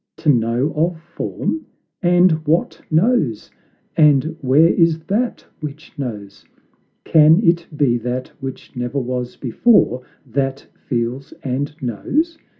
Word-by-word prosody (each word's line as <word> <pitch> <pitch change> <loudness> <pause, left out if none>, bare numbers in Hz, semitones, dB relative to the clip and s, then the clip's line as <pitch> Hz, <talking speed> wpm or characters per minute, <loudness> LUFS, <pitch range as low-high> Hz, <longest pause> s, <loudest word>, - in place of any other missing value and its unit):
To 155 - -1
know 120 +5 0
of 165 +2 0
form? 170 - -4 0.3
And 175 0 +4 0.2
what 165 +3 0
knows? 160 - +1 0.4
And 150 0 +4
where 140 +4 +5
is 165 -2 +3
that 210 +9 -2
which 150 +1 -8
knows? 105 -7 -6 0.6
Can 160 +2 +6
it 170 0 +2
be 125 -5 +2
that 125 +2 -4
which 135 +1 -8
never 125 +2 -3
was 125 -1 -3
before 130 - +2 0.2
That 135 +2 -2
feels 125 +3 -4
and 140 +3 -2
knows? 295 - -1
140 Hz, 120 wpm, -19 LUFS, 125-165 Hz, 0.6 s, Can